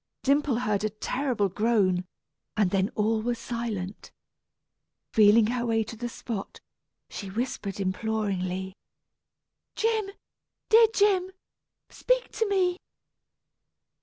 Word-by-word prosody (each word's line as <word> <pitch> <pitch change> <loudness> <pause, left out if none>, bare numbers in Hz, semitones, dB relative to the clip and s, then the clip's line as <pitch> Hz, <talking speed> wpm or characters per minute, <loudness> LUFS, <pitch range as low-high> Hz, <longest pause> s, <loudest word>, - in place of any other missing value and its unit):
Dimple 280 -1 +2
heard 215 -4 0
a 215 - +1
terrible 230 +1 -1
groan, 190 -3 +1 0.5
and 200 -4 +3
then 195 +1 +1
all 220 +1 +1
was 240 +1 -1
silent. 225 -5 -5 1.0
Feeling 215 +1 +6
her 240 +2 -1
way 225 -2 +1
to 225 - -8
the 240 +2 -4
spot, 225 -3 -6 0.5
she 200 - -7
whispered 205 -2 -3
imploringly, 190 -2 -2 1.0
"Jim, 440 -3 0 0.6
dear 455 0 +8
Jim, 395 -4 +3 0.6
speak - - 0
to 445 - -1
me!" 365 -3 +2
225 Hz, 105 wpm, -27 LUFS, 200-270 Hz, 1.0 s, dear